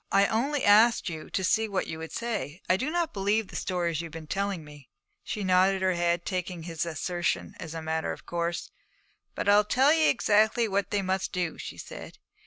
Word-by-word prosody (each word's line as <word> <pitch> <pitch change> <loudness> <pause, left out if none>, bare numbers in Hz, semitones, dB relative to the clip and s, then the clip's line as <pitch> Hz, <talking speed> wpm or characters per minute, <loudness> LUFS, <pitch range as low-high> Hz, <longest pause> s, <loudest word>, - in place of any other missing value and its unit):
'I 200 0 +5
only 270 +6 0
asked 220 +1 +5
you 160 -2 -7
to 190 - -2
see 220 +5 +2
what 195 -2 -1
you 160 - -6
would 160 0 -7
say. 215 -9 -3
I 185 - +4
do 260 +10 -2
not 340 0 -1
believe 205 +1 0
the - - -10
stories 170 -3 -1
you - - -6
have - - -15
been 160 0 -8
telling 195 0 -2
me.' 145 -3 -14 0.3
She 210 - -4
nodded 190 +1 +3
her 185 0 +3
head, 175 0 0
taking 180 -3 -3
his 165 0 -3
assertion 175 +2 -2
as 165 0 -7
a 165 - -5
matter 160 0 -1
of - - -9
course. 170 0 -3 0.6
'But - - -3
I'll 205 +1 +6
tell 265 +7 +4
you 320 -1 +4
exactly 220 +2 +3
what 200 -1 -1
they 205 -1 0
must 190 0 -1
do,' 180 -3 -2
she - - -7
said. - - -9
190 Hz, 210 wpm, -28 LUFS, 170-210 Hz, 0.6 s, I'll